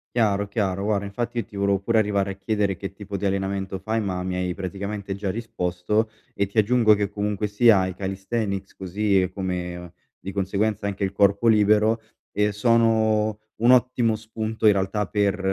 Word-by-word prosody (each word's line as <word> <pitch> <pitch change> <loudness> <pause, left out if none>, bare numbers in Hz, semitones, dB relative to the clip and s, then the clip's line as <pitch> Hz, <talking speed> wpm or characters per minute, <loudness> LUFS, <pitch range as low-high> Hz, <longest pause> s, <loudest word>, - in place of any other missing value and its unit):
Chiaro, 100 -4 +2
chiaro 100 -2 -1
guarda 100 -1 0
infatti 120 +4 -4
io 115 - -1
ti - - -20
volevo 100 0 +1
pure 110 +4 +1
arrivare 100 -2 +1
a - - -9
chiedere 100 0 -1
che 95 +2 -6
tipo 100 0 -6
di 100 +1 -2
allenamento 95 0 -2
fai, 110 +4 -1
ma 95 -4 -2
mi 95 - -2
hai 90 -1 -2
praticamente 100 +1 -4
già 100 -1 -3
risposto, 105 0 -1 0.2
e 100 - 0
ti 100 - -5
aggiungo 110 0 +5
che 100 -1 -1
comunque 105 +1 -2
sia 105 -2 +4
i 95 - -5
calisthenics 95 +1 -3
così 95 0 0
come 90 -2 -4 0.3
di 95 - -7
conseguenza 100 +2 -1
anche 100 0 -2
il 95 - -2
corpo 100 +2 +2
libero, 110 +1 +4 0.3
ehm, 105 0 +1
sono 110 -1 +2 0.2
un 120 +2 +5
ottimo 125 -3 +3
spunto 110 0 -3
in 105 - +8
realtà 100 +1 -1
per 100 0 0
100 Hz, 180 wpm, -24 LUFS, 95-110 Hz, 0.3 s, in